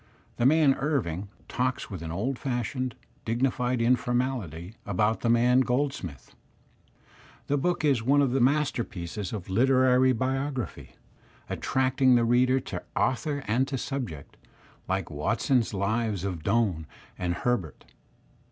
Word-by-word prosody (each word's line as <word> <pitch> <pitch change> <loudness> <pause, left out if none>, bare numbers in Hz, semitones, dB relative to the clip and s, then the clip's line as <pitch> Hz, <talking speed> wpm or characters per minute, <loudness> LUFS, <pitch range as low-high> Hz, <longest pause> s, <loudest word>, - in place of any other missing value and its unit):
The 120 - +4
man 150 -1 +5
Irving, 105 - -1 0.2
talks 125 0 -2
with 95 -4 -6
an 80 -1 -5
old 120 +10 -2
fashioned, 125 -1 -2 0.3
dignified 125 +1 0
in 120 +2 +4
formality 120 - -2
about 105 +3 0
the 115 - 0
man 120 +2 +4
Goldsmith. 125 - -2 1.1
The 145 0 0
book 175 +1 0
is 135 -5 +3
one 140 +5 +3
of 140 -3 +3
the 130 0 +1
masterpieces 115 - -1
of 105 -5 -5
literary 130 +4 +4
biography, 130 +1 -3 0.6
attracting 130 0 +2
the 120 -1 +3
reader 125 +2 +3
to - - -6
author 145 +2 0
and 125 +5 +1
to 135 - -3
subject, 120 - -5 0.5
like 95 -3 -2
Walton's 115 - +1
lives 105 0 -1
of 90 -5 -3
Doime 95 -4 0 0.3
and 90 -1 -2
Herbert. 100 -8 -2
125 Hz, 130 wpm, -27 LUFS, 100-130 Hz, 1.1 s, man